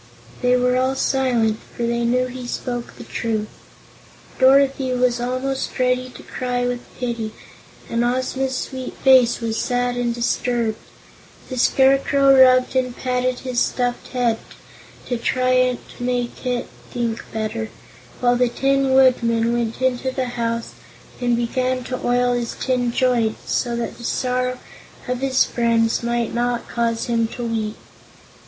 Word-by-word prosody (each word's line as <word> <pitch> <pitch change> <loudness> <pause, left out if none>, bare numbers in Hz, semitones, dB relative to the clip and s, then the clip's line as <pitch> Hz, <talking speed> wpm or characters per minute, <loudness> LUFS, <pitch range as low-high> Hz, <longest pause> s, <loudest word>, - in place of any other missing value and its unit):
They 250 0 +4
were 250 0 +2
all 260 +1 +1
silent, 245 -5 +1 0.2
for 240 - -2
they 235 0 0
knew 250 +2 +2
he 250 0 -7
spoke 245 -1 -4
the - - -9
truth. 220 -2 -2 0.9
Dorothy 270 0 +4
was 245 -1 +1
almost 255 +2 -2
ready 255 0 +1
to - - -12
cry 245 -1 -2
with 245 0 -1 0.2
pity 235 -3 -3 0.5
and 230 +1 0
Ozma's 260 +2 -1
sweet 260 0 -5
face 255 -3 +5
was 225 -1 -1
sad 245 -1 0
and 240 -1 0
disturbed. 235 -1 -1 0.7
The 255 - -5
Scarecrow 275 +1 +4
rubbed 255 0 +5
and 250 -1 0
patted 250 0 -1
his 255 -2 -1
stuffed 245 0 -1
head 240 -3 0 0.7
to 245 - -2
try 255 +1 +2 0.2
to - - -6
make 245 0 -2
it 245 -1 -1 0.2
think 235 -2 -2
better, 215 - -3 0.5
while 245 0 +4
the 250 0 +3
Tin 270 +1 +1
Woodman 235 -3 +3
went 235 +1 -2
into 260 0 +1
the 260 -1 -2
house 230 -1 -2 0.5
and 240 -1 +2
began 255 +2 -1
to 255 +1 -5
oil 245 0 +2
his 240 -1 -2
tin 250 -2 0
joints 235 -3 0
so 240 -1 0
that 235 +1 -4
the - - -10
sorrow 250 +1 -1 0.5
of 250 0 -1
his 265 -1 +3
friends 230 -1 +1
might 235 -1 -1
not 240 0 -1
cause 230 -1 -1
him 230 -1 +1
to 240 - -5
weep. 220 -2 -2
245 Hz, 145 wpm, -21 LUFS, 235-255 Hz, 0.9 s, face